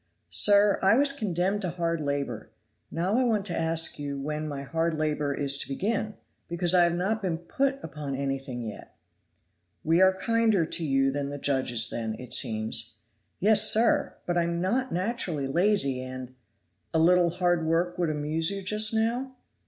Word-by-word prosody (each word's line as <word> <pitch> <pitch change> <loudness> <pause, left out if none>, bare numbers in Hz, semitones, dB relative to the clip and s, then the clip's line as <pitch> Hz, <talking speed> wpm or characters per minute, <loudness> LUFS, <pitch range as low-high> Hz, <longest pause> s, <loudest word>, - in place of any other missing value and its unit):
"Sir, 205 0 +4
I 195 +3 +4
was 280 +2 +3
condemned 200 -5 -1
to 185 - -2
hard 170 -1 -2
labor; 140 -1 -3 0.4
now 185 +8 0
I - - +2
wanted 220 -5 0
to - - -2
ask 165 -1 +2
you 140 -1 -4
when 150 +2 -4
my 140 -2 -5
hard 165 +2 -1
labor 150 -2 -1
is 140 0 -1
to - - -4
begin, 210 +9 -2 0.3
because 175 0 0
I 175 -1 +6
have 170 0 0
not 205 +5 -1
been 180 -4 -2
put 270 +11 -1
upon 145 -3 -5
anything 135 -2 -4
yet." 110 -3 -9 0.9
"We 165 +3 +3
are 190 0 +5
kinder 225 -4 +2
to 165 - -3
you 135 -2 +1
than 140 0 -3
the 145 - -6
judges 130 -5 +1
then, 110 -1 -3
it 125 0 -8
seems." 110 -2 0 0.4
"Yes, 210 +3 +4
sir! 230 +2 +2
but 175 0 0
I - - +2
am 170 0 -2
not 245 +9 -1
naturally 180 - -2
lazy, 150 -3 +1
and 130 0 -8 0.3
" 85 0 -45
"A - - +4
little 175 +2 +4
hard 175 -2 0
work 175 +2 0
would 170 -2 +1
amuse 155 +2 0
you 200 -1 -3
just 215 +3 +3
now?" 245 +4 -1
170 Hz, 180 wpm, -27 LUFS, 140-195 Hz, 0.9 s, I